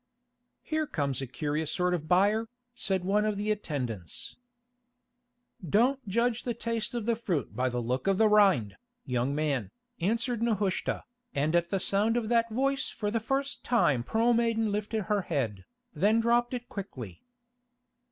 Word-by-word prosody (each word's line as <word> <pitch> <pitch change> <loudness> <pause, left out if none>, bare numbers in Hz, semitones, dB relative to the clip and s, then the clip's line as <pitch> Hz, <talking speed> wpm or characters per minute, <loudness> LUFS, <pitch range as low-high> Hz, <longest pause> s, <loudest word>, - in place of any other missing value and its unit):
"Here 310 -1 -1
comes 140 - -2
a 135 - -4
curious 150 +4 -2
sort 180 0 +1
of 160 -3 -2
buyer," 205 +6 +3 0.2
said 190 -6 0
one 205 +2 +2
of 215 -1 0
the 210 +1 0
attendants. 125 - -4 1.3
"Don't 245 - +2
judge 235 +3 +1
the 240 -2 -3
taste 230 -1 -2
of 235 -3 -2
the 235 0 +2
fruit 185 - -2
by 130 +1 +1
the 120 -1 -2
look 125 +8 -2
of 195 -1 +3
the 220 - +5
rind, 195 - +4 0.3
young 125 +1 0
man," 145 -8 0 0.3
answered 230 +5 0
Nehushta, 210 -5 0 0.3
and 150 +4 +1
at 170 0 +2
the 195 - 0
sound 210 +5 +1
of 225 -3 -1
that 230 -1 +3
voice 270 +4 0
for 210 -2 -3
the 230 - +1
first 270 +5 -2
time 150 - +3
Pearl 225 - +2
Maiden 230 -2 +1
lifted 210 +1 -1
her 210 0 +1
head, 125 - -2 0.3
then 205 +8 +3
dropped 240 +2 +2
it 245 0 -6
quickly. 130 - -7
205 Hz, 160 wpm, -29 LUFS, 150-230 Hz, 1.3 s, the